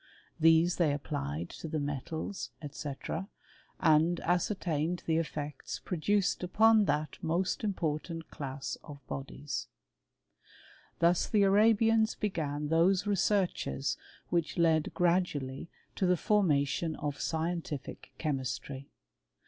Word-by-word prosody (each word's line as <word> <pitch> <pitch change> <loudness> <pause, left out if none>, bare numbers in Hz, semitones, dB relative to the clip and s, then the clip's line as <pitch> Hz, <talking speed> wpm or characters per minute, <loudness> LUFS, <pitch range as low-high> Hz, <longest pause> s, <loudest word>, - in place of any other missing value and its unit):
These 165 +2 +5
they^ 155 -5 +3
applied 75 - -4
to - - -7
the 155 0 -2
metals, 145 +6 -4 0.2
&c., 145 -1 -5 0.9
and 165 +1 +4
ascertained 175 -2 0
the 160 -1 +2
efFeetjT 150 -2 -4
produced 195 +3 +1
upon 215 +4 +5
that 155 -4 -1
most 170 +6 0
important 165 -4 -2
class 135 -1 -5
of 145 -2 -9
bodielk|[ 140 +1 -5 1.3
Thus 170 +1 +3
the 210 -2 +3
Arabians 220 +2 +4
began 150 -8 -2
those 180 +5 +3
researches 195 -7 +1 0.3
which 170 0 0
h 160 -2 +3
gradually 170 -6 0 0.3
to 190 - +2
the 180 0 +3
formation 160 -5 +2
of 145 -1 -4
scientific 160 -3 -3
chemistry. 135 -2 -3
165 Hz, 105 wpm, -31 LUFS, 150-185 Hz, 1.3 s, These